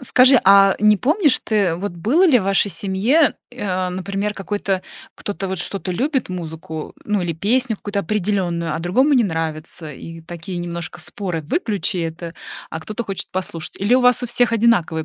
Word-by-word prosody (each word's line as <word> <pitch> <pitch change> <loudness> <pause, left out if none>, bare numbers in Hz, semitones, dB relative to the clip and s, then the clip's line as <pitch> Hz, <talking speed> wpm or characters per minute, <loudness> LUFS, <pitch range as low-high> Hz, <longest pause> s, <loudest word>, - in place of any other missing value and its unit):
Скажи, 255 0 +6
а 195 0 +6
не 210 0 +5
помнишь 300 - +2
ты, 200 -6 +1
вот 200 +4 -4
было 245 - +2
ли 290 -8 +6
в 190 - -3
вашей 195 +1 +2
семье, 205 - +2 0.2
э, 245 -3 -7
а, 185 -1 -1
например, 195 +3 -3
какой-то 195 -1 -2 0.3
кто-то 200 -2 -4
вот 190 -2 -3
что-то 190 +1 -3
любит, 260 - -1
музыку, 160 -3 -6
ну 210 -2 0
или 175 -1 -1
песню 225 - +1
какую-то 205 0 -3
определенную, 180 -4 -1
а - - -2
другому 250 - +2
не 245 -4 +4
нравится? 160 -2 -4
И 165 +4 -10
такие 175 +2 -7
немножко 170 0 -5
споры: 175 -1 -4
"Выключи 205 - -1
это!" 165 0 -4 0.4
А 160 - -4
кто-то 215 +8 -5
хочет 195 -4 -5
послушать? 170 -3 -4
Или 205 +6 +3
у 260 - +5
вас 250 0 +4
у - - -1
всех 240 0 +1
одинаковые 190 -9 +2
195 Hz, 180 wpm, -20 LUFS, 170-225 Hz, 0.4 s, Скажи